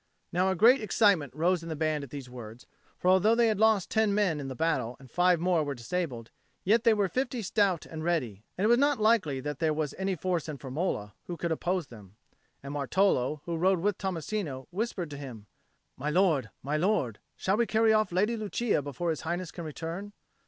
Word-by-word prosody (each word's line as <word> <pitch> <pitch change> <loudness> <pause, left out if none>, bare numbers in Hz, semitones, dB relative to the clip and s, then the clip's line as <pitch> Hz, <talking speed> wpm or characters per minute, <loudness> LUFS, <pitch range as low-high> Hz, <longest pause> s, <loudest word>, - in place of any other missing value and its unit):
Now 185 +2 +2
a 190 - +1
great 235 +8 +6
excitement 200 - +2
rose 175 +3 +1
in 165 - -8
the 160 - -3
band 155 -1 -1
at 140 - -9
these 140 -1 -7
words; 120 -2 -10 0.3
for - - -3
although 190 +5 +5
they 235 -1 +4
had 215 -2 0
lost 220 -4 +3
ten 220 -2 +2
men 190 -7 +1
in 140 - -5
the 130 - -5
battle 125 -6 -1
and 130 -3 -16
five 180 0 +3
more 175 -2 +2
were 145 -1 -3
disabled, 120 -2 -4 0.3
yet 220 +4 +3
they 230 - +5
were 205 -2 +2
fifty 250 +2 -2
stout 190 -3 +1
and 160 -1 -7
ready; 125 - -1
and 195 - +1
it - - +4
was 240 +2 +5
not 285 -2 +2
likely 210 -11 +2
that 150 0 -5
there 160 -2 +1
was 155 -2 -2
any 190 0 0
force 175 -2 -2
in 150 - -5
Firmola 130 - -3 0.2
that 175 - -5
could 170 0 -2
oppose 175 +2 -1
them. 105 -6 -14 0.5
And 140 +1 -6
Martolo, 145 -1 +1
who 170 -1 -2
rode 185 +1 +2
with 205 +1 0
Tommasino, 175 -6 -3
whispered 185 -4 -3
to 145 - -6
him, 125 -7 -9 0.5
"My 145 +3 -2
lord, 155 - +2
my 145 +3 -1
lord, 155 - 0 0.2
shall 190 +2 +1
we 235 0 +2
carry 220 0 +3
off 215 0 +2
the 175 - -7
Lady 210 +5 +2
Lucia 215 -3 0
before 145 +5 -3
His 155 - -4
Highness 175 +1 -3
can 170 -2 -7
return?" 165 +6 -6
170 Hz, 215 wpm, -29 LUFS, 145-200 Hz, 0.5 s, great